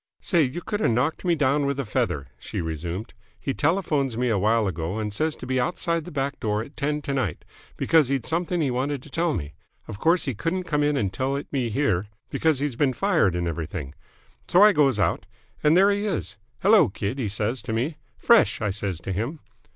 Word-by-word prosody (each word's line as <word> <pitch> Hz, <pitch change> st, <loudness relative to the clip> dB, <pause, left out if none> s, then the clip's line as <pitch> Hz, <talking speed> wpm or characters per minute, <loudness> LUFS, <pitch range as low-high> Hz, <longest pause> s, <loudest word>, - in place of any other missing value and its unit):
"Say, 175 Hz, -4 st, +2 dB
you 145 Hz, +4 st, -1 dB
could 210 Hz, -, -2 dB
have 210 Hz, -, +2 dB
knocked 125 Hz, +10 st, 0 dB
me 175 Hz, -1 st, +3 dB
down 145 Hz, -1 st, +2 dB
with 140 Hz, 0 st, -1 dB
a 135 Hz, -, -1 dB
feather!" 75 Hz, -, -1 dB
she -, -, -5 dB
resumed. 85 Hz, +6 st, -4 dB, 0.3 s
"He 135 Hz, -, -2 dB
telephones 145 Hz, -7 st, 0 dB
me 125 Hz, 0 st, +1 dB
awhile 110 Hz, +1 st, +2 dB
ago 85 Hz, +1 st, -3 dB
and 105 Hz, -1 st, -3 dB
says 155 Hz, +7 st, 0 dB
to -, -, -9 dB
be 130 Hz, 0 st, 0 dB
outside 170 Hz, +4 st, -1 dB
the 180 Hz, -, -8 dB
back 140 Hz, 0 st, -2 dB
door 105 Hz, -2 st, -1 dB
at 140 Hz, -, -14 dB
ten 150 Hz, +1 st, -1 dB
to 140 Hz, -, -2 dB
night, 120 Hz, -, -2 dB, 0.3 s
because 160 Hz, -5 st, +4 dB
he'd 135 Hz, -3 st, -1 dB
something 170 Hz, +1 st, 0 dB
he 140 Hz, -4 st, +1 dB
wanted 130 Hz, +2 st, -2 dB
to 150 Hz, -, -14 dB
tell 165 Hz, 0 st, 0 dB
me. 75 Hz, -2 st, -5 dB, 0.3 s
Of 105 Hz, -, -7 dB
course 170 Hz, +6 st, +3 dB
he 135 Hz, -, -1 dB
couldn't 170 Hz, -, -2 dB
come 150 Hz, -4 st, 0 dB
in 145 Hz, 0 st, +2 dB
and 100 Hz, -6 st, -1 dB
tell 135 Hz, +1 st, -1 dB
it 140 Hz, -, -4 dB
me 130 Hz, -4 st, 0 dB
here, 105 Hz, -6 st, 0 dB, 0.2 s
because 160 Hz, -3 st, +2 dB
he'd 135 Hz, -3 st, -3 dB
been 140 Hz, -3 st, +3 dB
fired 165 Hz, -, +2 dB
and 85 Hz, 0 st, -1 dB
everything. 80 Hz, -3 st, -4 dB, 0.5 s
So 180 Hz, +3 st, +6 dB
I 210 Hz, 0 st, +7 dB
goes 140 Hz, -, +3 dB
out, 95 Hz, -2 st, 0 dB, 0.4 s
and 155 Hz, +3 st, +5 dB
there 195 Hz, +2 st, +6 dB
he 205 Hz, +1 st, -1 dB
is. 165 Hz, -, -2 dB, 0.3 s
'Hello, 195 Hz, -, +6 dB
kid!' 100 Hz, +7 st, -4 dB
he 110 Hz, -5 st, -1 dB
says 110 Hz, +5 st, -2 dB
to -, -, -5 dB
me. 130 Hz, +8 st, -1 dB, 0.2 s
'Fresh!' 235 Hz, -2 st, +4 dB
I 105 Hz, -3 st, -1 dB
says 95 Hz, -4 st, -3 dB
to 95 Hz, -, -4 dB
him. 120 Hz, -, -3 dB
135 Hz, 220 wpm, -25 LUFS, 105-155 Hz, 0.5 s, I